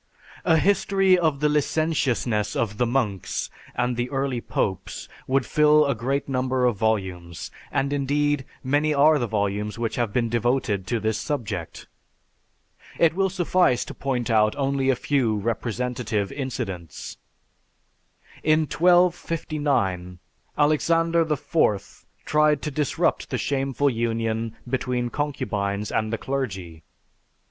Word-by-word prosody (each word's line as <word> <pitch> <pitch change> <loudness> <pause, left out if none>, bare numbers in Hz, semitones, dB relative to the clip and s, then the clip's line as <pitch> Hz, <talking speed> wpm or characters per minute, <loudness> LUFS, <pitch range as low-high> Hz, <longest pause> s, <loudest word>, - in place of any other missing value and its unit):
A 165 -2 +5
history 195 +1 +3
of 160 -5 +1
the 150 - +4
licentiousness 140 -8 0
of 110 -2 -2
the 125 - +2
monks 115 -7 -1 0.2
and 125 0 0
the 120 +1 -2
early 135 -3 -1
popes 95 -5 -3 0.2
would 130 -1 +2
fill 150 0 +4
a 140 - +1
great 135 +5 -2
number 130 -1 0
of 120 -3 +2
volumes; 95 -6 -2 0.2
and 140 +1 0
indeed, 145 0 +1 0.2
many 145 +3 +1
are 150 +2 +5
the 120 - -1
volumes 105 0 -1
which 115 -1 -2
have 120 -4 0
been 120 +1 +1
devoted 115 -4 0
to 115 +3 0
this 110 0 -1
subject. 105 - -4 1.1
It 165 -2 +4
will 195 +2 +1
suffice 180 -7 +2
to - - -8
point 125 -3 -2
out 105 -1 +3
only 135 -1 0
a 135 - +4
few 120 -6 +1
representative 115 -1 -2
incidents. 115 - -5 1.2
In 155 +1 +3
1259, 155 - +1 0.4
Alexander 165 +2 +2
IV 105 - 0 0.2
tried 150 -1 +3
to 150 - -2
disrupt 145 -1 0
the - - -1
shameful 135 0 0
union 115 -1 -1
between 125 -1 -1
concubines 105 -8 -2
and 110 0 0
the 115 - -1
clergy. 95 -12 -4
130 Hz, 125 wpm, -24 LUFS, 110-150 Hz, 1.2 s, A